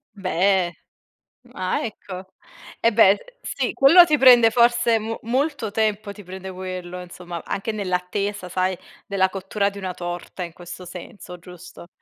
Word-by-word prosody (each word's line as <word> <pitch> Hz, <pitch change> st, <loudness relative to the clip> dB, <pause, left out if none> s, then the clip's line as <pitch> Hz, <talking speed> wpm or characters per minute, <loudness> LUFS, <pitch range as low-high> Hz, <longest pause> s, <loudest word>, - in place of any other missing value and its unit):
Beh, 185 Hz, -1 st, +1 dB, 0.8 s
ah 185 Hz, -4 st, -2 dB
ecco 190 Hz, -4 st, -8 dB, 0.5 s
e 230 Hz, -, +3 dB
beh, 215 Hz, -3 st, +6 dB
uhm, 205 Hz, -, +1 dB, 0.2 s
sì -, -, -2 dB
quello 335 Hz, +6 st, +8 dB
ti 305 Hz, -3 st, +2 dB
prende 245 Hz, -4 st, +7 dB
forse 235 Hz, -1 st, +3 dB
mo 225 Hz, +1 st, -4 dB
molto 255 Hz, -2 st, -1 dB
tempo 215 Hz, -1 st, -1 dB
ti 205 Hz, 0 st, -12 dB
prende 190 Hz, +1 st, -8 dB
quello 180 Hz, -1 st, -6 dB
insomma 175 Hz, -1 st, -8 dB
anche 210 Hz, +3 st, -3 dB
nell'attesa 195 Hz, 0 st, -3 dB
sai 185 Hz, 0 st, 0 dB, 0.3 s
della 190 Hz, -1 st, +2 dB
cottura 195 Hz, +2 st, -1 dB
di 200 Hz, -, -12 dB
una 190 Hz, -2 st, -4 dB
torta 175 Hz, +1 st, -6 dB
in 170 Hz, -2 st, -8 dB
questo 175 Hz, +1 st, -10 dB
senso 180 Hz, 0 st, -10 dB
giusto? 175 Hz, 0 st, -13 dB
190 Hz, 150 wpm, -22 LUFS, 180-220 Hz, 0.8 s, quello